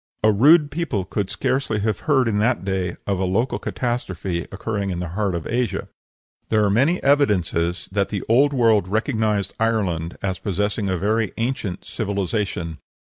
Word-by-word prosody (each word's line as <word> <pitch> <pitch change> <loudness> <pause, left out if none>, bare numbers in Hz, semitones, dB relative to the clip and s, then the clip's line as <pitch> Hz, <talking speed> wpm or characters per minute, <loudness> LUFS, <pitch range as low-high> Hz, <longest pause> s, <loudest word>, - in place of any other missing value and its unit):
A 110 - +6
rude 145 +7 +5
people 145 - -2
could 100 0 -2
scarcely 130 -5 -1
have 110 +1 0
heard 130 -4 +4
in 105 -2 +1
that 115 -2 +1
day 95 -2 -2
of 100 -2 -1
a - - 0
local 100 +8 0
catastrophe 95 -8 -3
occurring 100 0 -3
in 90 - -2
the 90 -1 -4
heart 95 +1 -1
of 85 - -4
Asia. 120 -3 -1 0.6
There 110 -1 +3
are 100 - +2
many 140 - +2
evidences 90 - +2
that 100 0 0
the 100 -3 -3
Old 135 +6 +4
World 115 -7 +3
recognized 110 0 0
Ireland 95 -8 0
as 95 -2 -2
possessing 105 +1 -1
a 95 - 0
very 110 +3 0
ancient 115 -6 -3
civilization. 100 -5 -2
105 Hz, 165 wpm, -22 LUFS, 95-115 Hz, 0.6 s, A